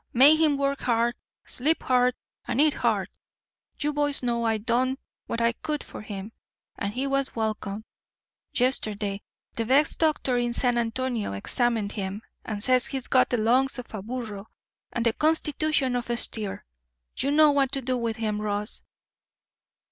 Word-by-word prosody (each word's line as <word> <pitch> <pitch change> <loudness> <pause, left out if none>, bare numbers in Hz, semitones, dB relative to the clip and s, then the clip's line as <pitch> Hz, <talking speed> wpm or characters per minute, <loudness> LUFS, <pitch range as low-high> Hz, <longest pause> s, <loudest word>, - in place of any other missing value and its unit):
Make 285 +6 +7
him 305 -3 +3
work 280 0 0
hard, 235 -1 +2 0.3
sleep 305 +6 0
hard, 250 -1 +3 0.3
and - - -1
eat 300 0 +5
hard. - - 0 0.7
You 295 0 -1
boys 290 -2 +1
know 235 -1 0
I 225 -1 +2
done 250 +4 0 0.3
what 230 - -2
I 230 0 +4
could 300 +5 -4
for - - -9
him, 205 0 -7 0.4
and 200 - -3
he 255 +5 -2
was 275 0 -1
welcome. 215 -1 -3 0.7
Yesterday 210 -6 0 0.3
the 230 - -1
best 275 +6 +3
doctor 305 -5 +2
in 240 0 0
San 245 -1 +1
Antone 235 - -2
examined 225 - 0
him, 200 +1 -4 0.2
and 205 -1 -3
says 255 -1 +4
he's 265 -2 -4
got 255 - +4
the 245 - +1
lungs 255 +5 +2
of 250 -2 -9
a 215 - -4
burro 215 -2 -6 0.4
and 235 - -2
the 230 - +3
constitution 310 -3 +1
of 240 -1 -3
a 235 - 0
steer. 215 -4 0 0.5
You 275 - +1
know 300 +1 +6
what 275 -2 +2
to 270 - -1
do 255 +1 0
with 230 -2 -1
him, 215 -2 -2
Ross." 210 0 -2
245 Hz, 165 wpm, -26 LUFS, 220-270 Hz, 0.7 s, Make